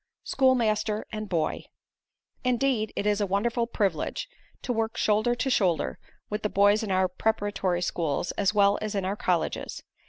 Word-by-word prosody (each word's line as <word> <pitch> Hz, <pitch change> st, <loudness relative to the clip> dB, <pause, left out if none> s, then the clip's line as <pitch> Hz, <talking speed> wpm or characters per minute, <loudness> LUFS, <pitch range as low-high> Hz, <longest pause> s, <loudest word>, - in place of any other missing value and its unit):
SCHOOLMASTER 220 Hz, -5 st, +2 dB
AND 215 Hz, -2 st, -5 dB
BOY 160 Hz, -3 st, -1 dB, 0.8 s
Indeed 250 Hz, -3 st, +1 dB
it -, -, -2 dB
is 210 Hz, 0 st, +2 dB
a 205 Hz, -, +1 dB
wonderful 230 Hz, +5 st, 0 dB
privilege 200 Hz, -8 st, -1 dB, 0.4 s
to 250 Hz, -, -1 dB
work 225 Hz, 0 st, -1 dB
shoulder 215 Hz, +3 st, +2 dB
to 265 Hz, +3 st, -1 dB
shoulder 170 Hz, -, +1 dB, 0.3 s
with 210 Hz, +1 st, -3 dB
the 210 Hz, -, -1 dB
boys 205 Hz, +2 st, +4 dB
in 220 Hz, -, -4 dB
our 185 Hz, 0 st, +3 dB
preparatory 195 Hz, -2 st, -1 dB
schools 165 Hz, -2 st, -1 dB
as 200 Hz, -1 st, +1 dB
well 200 Hz, -1 st, +3 dB
as 215 Hz, -1 st, -3 dB
in 195 Hz, -2 st, -1 dB
our 195 Hz, +2 st, -1 dB
colleges. 180 Hz, -5 st, -2 dB
210 Hz, 160 wpm, -27 LUFS, 190-225 Hz, 0.8 s, boys